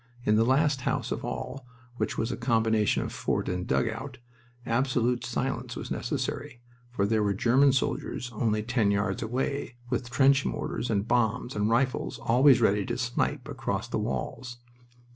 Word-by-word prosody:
In 105 - +4
the 110 - +4
last 135 +2 +2
house - - -1
of - - -3
all, 135 +1 -5 0.3
which - - -2
was 115 - -1
a - - -2
combination 110 -3 +2
of - - -5
fort - - -1
and 90 0 -2
dugout, 125 +4 -1 0.5
absolute 125 0 +1
silence - - -3
was - - -6
necessary, 145 -4 -3 0.3
for 110 -5 0
there 110 +1 +2
were 100 -1 +1
German 130 +7 +4
soldiers 125 -1 -2
only 110 -1 0
ten 115 -2 +1
yards 100 +1 0
away, 130 +3 -2 0.2
with 125 0 -1
trench 135 +3 +4
mortars 120 - -3
and 105 -1 0
bombs 120 +1 +1
and 105 +1 +1
rifles 125 +3 0
always 125 +2 +5
ready 105 -2 +3
to - - -2
snipe 125 +2 -1
across 135 -3 -3
the - - -2
walls. 120 -2 -4
120 Hz, 160 wpm, -28 LUFS, 110-130 Hz, 0.5 s, always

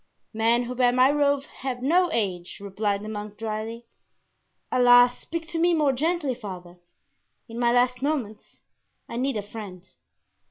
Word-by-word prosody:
"Men 230 +2 +2
who 245 +1 -5
bear 250 -1 +3
my 255 +2 +4
robe 285 -1 +2 0.2
have 255 -2 -4
no 350 +6 +3
age," 185 - -2
replied 200 0 -2
the - - -7
monk, 210 -1 -6
dryly. 225 +2 -5 0.9
"Alas, 245 0 +6
speak 330 0 -5
to 335 - -3
me 345 +1 +3
more 295 -4 +2
gently, 310 0 0
father; 180 -6 -9 0.7
in 230 0 -7
my 240 -1 +3
last 250 +1 +2
moments 260 -8 -3 0.5
I 235 - -6
need 260 -1 -1
a 205 - -3
friend." 200 -4 -9
245 Hz, 155 wpm, -25 LUFS, 210-270 Hz, 0.9 s, Alas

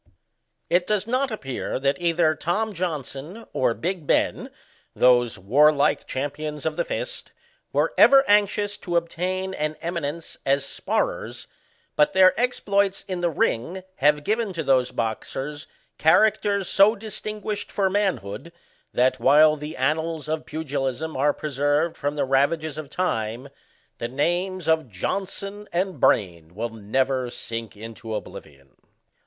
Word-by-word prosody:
It 175 +1 +2
does 210 -2 +1
not 255 +4 0
appear 135 - -4
that 140 +5 0
either 170 -2 +3
Tom 205 +8 -1
Johnson 165 - -5
or 120 -3 +1
Big 175 -3 -3
Bbn, - - +1 0.5
those 120 -3 +4
warlike 145 +9 +3
champions 145 +2 -4
of - - -1
the - - 0
fist, - - -5 0.4
were - - +1
ever 275 +2 +7
anxious 205 0 +2
to 175 -2 -1
obtain 185 +3 -2
an 155 -2 -2
eminence 165 -2 -4
as 140 +1 +1
sparrers, - - -2 0.5
but 150 - +3
their 185 0 +6
exploits 200 -5 +1
in 185 -2 -3
the 175 - +2
ring 165 +4 -1
have 150 +1 +3
given 215 +2 -1
to 165 -2 -3
those 130 -3 +3
boxers 135 +6 -4 0.3
CHARACTERS 200 +3 +3
SO 200 +3 +5
distinguished 210 -1 -5
for 195 -2 +1
manhood, 170 - -2 0.4
that, 130 +1 +2
while 150 +3 +6
the 150 +2 -7
annals 155 +3 -1
of 155 0 -3
pugilism 145 -1 -3
are 140 +3 +3
preserved 145 +3 0
from 145 0 -2
the 145 - 0
ravages 145 +3 +1
of 150 -3 -7
time, 120 -6 -2 0.5
the 120 - -2
names 175 +7 -1
of 160 -5 +2
Johnson 195 - -4
and 180 -3 -1
Brain 85 -7 +1
will 115 +3 -2
never 125 +4 -1
sink 115 -3 -6
into 115 +1 -7
oblivion. 70 -9 -10
155 Hz, 135 wpm, -24 LUFS, 135-190 Hz, 0.5 s, ever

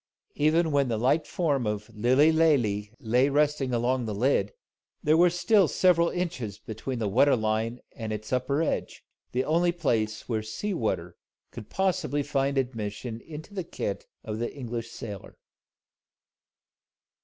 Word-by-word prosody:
Even 160 +2 +2
when 140 -2 +2
the 115 -2 -1
light 130 +8 +2
form 145 -9 0
of 105 +2 -4
Lilly 130 +8 +4
Lalee 125 -11 +2
lay 125 +5 +2
resting 145 -2 +1
along 125 +1 +1
the 105 -2 -3
lid, 105 -3 +2 0.5
there 155 +1 +4
were 175 +2 +6
still 190 +2 +3
several 170 -1 +3
inches 145 - -3
between 110 +4 -5
the 110 -2 -1
water 140 +8 +4
line 110 +1 -1
and 110 -2 -6
its 110 +3 -5
upper 140 +5 +1
edge, - - -3 0.3
the 130 +2 0
only 170 +3 +3
place 110 -11 -1
where 110 -3 -1
sea 110 - -4
water 90 - -2 0.3
could 105 - -9
possibly 165 -7 0
find 140 -1 0
admission 115 -2 -3
into 155 +5 -9
the 190 -2 -3
kit 465 - -4 0.2
of 110 0 -4
the 120 - -2
English 120 -4 -5
sailor. 105 -4 -8
130 Hz, 150 wpm, -27 LUFS, 110-155 Hz, 0.5 s, were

